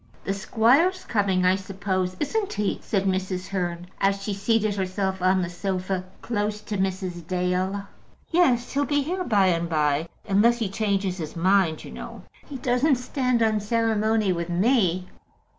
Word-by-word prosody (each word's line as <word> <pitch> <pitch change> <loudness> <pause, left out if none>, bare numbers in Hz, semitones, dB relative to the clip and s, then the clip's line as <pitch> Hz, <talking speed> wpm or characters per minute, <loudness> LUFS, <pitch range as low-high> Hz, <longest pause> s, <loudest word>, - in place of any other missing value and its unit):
"The 195 - -1
squire's 250 - +3
coming, 195 -4 +1
I 185 +1 +5
suppose, 190 -1 -2
isn't 400 +7 -1
he?" 210 -1 -1
said 195 -3 -1
Mrs. 185 -1 -2
Hearn, 175 -2 -3
as 195 0 +1
she 205 - -2
seated 215 +1 +1
herself 190 -1 -2
on 185 0 +3
the - - -2
sofa 185 0 -2 0.2
close 210 -2 -1
to 210 -1 -4
Mrs. 185 -3 -3
Dale. 185 +2 -1 0.5
"Yes, 260 -9 +3
he'll 285 +1 +1
be 290 -1 +1
here 365 +5 -2
by 200 - +3
and 170 -1 0
by; 150 0 +1 0.2
unless 215 +5 +4
he 225 -4 -2
changes 195 -2 -1
his 155 -2 -6
mind, 180 -2 +2
you - - -9
know. - - -9 0.2
He 280 - -6
doesn't 255 +3 +2
stand 250 -1 0
on 215 -1 +2
ceremony 220 -2 +1
with 170 0 -4
me." 185 -2 +2
195 Hz, 160 wpm, -25 LUFS, 185-225 Hz, 0.5 s, I